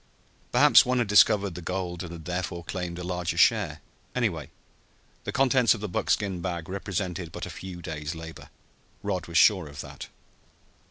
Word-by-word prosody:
Perhaps - - +7
one 125 0 0
had 120 - +2
discovered 100 -1 +5
the 90 - -7
gold 90 -1 -3
and 90 -2 -6
had 85 -2 -9
therefore 90 0 -3
claimed 90 0 -4
a 90 - -6
larger 90 -1 -2
share. 90 -6 +3 0.3
Anyway, - - -1 0.8
the - - -2
contents 130 -3 +4
of - - -8
the 105 - -4
buckskin 95 0 -1
bag 85 -3 -4
represented 95 -3 -4
but - - -5
a - - -7
few 90 -2 -8
days' 75 0 -5
labor. 80 0 -10 0.5
Rod 95 -3 -2
was 85 0 -1
sure 95 -4 +5
of 70 0 -8
that. - - -9
90 Hz, 170 wpm, -27 LUFS, 85-100 Hz, 0.8 s, Perhaps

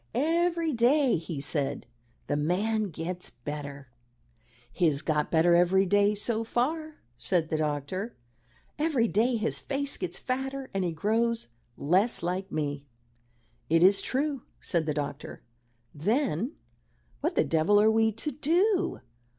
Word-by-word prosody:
"Every 330 +3 +1
day," 255 - +3
he 160 -2 -5
said, 145 -1 -1 0.4
"the 145 - -1
man 200 +9 0
gets 175 0 -4
better." 140 +1 -7 0.8
"He 175 - +2
has 145 -2 0
got 150 -2 0
better 165 +1 +4
every 180 +3 +4
day, 205 +2 +3
so 225 +2 -1
far," 310 +7 -2 0.2
said 170 0 0
the 155 - 0
doctor. 155 - -3 0.6
"Every 295 -7 +2
day 235 +4 +2
his 220 0 -1
face 280 0 -2
gets 180 -2 -4
fatter, 265 +1 -4
and 195 -1 0
he 175 - 0
grows 225 - 0 0.3
less 185 +10 +2
like 185 +2 -2
me." 145 -2 -3 0.8
"It 165 +2 +4
is 195 +2 +6
true," 275 0 -1 0.2
said 165 -3 -1
the 150 - -1
doctor. 145 -1 -5 0.5
"Then 225 - 0 0.7
what - - -1
the - - +4
devil 165 +6 +3
are 215 +1 +5
we 220 0 +3
to 225 +8 -4
do?" 350 - +1
200 Hz, 140 wpm, -28 LUFS, 160-255 Hz, 0.8 s, is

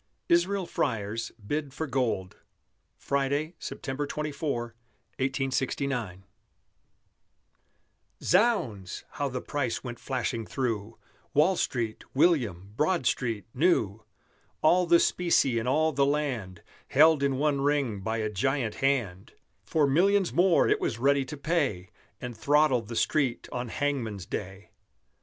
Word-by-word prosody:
ISRAEL 185 +3 +3
FREYER'S 115 -6 -2
BID 145 +2 -3
FOR 160 - -2
GOLD 125 -9 -1 0.6
FRIDAY, 140 +3 -1
SEPTEMBER 145 +1 -4
24, 150 -4 -2 0.6
1869 130 -6 -1 2.0
Zounds! 170 - +1
how 140 -1 -2
the 125 -1 -4
price 135 -5 -2
went 120 -2 -6
flashing 120 -3 -2
through 115 -3 -3 0.4
Wall 160 +6 +4
Street, 115 -9 -2
William, 120 - +2
Broad 155 +1 +1
Street, 115 -4 0
New! 115 - +1 0.6
All 180 +3 +4
the 170 0 +6
specie 165 -11 +2
in 115 - -4
all 155 +4 +2
the 140 -1 +2
land 130 - -1 0.2
Held 155 +1 +5
in 140 -2 +1
one 145 -1 +1
Ring 140 -7 +1
by 110 +4 -2
a 110 -1 -1
giant 125 +2 0
hand 120 -10 0 0.3
For 155 -2 +2
millions 185 +7 +3
more 180 0 +4
it - - +2
was 115 - -1
ready 140 +3 +3
to 150 - -7
pay, 140 - -1 0.3
And 125 -2 -6
throttle 145 -1 +3
the 115 +1 -8
Street 130 -1 0
on 125 0 -3
hangman's 115 -8 -2
day. 95 0 -6
135 Hz, 125 wpm, -28 LUFS, 115-150 Hz, 2.0 s, the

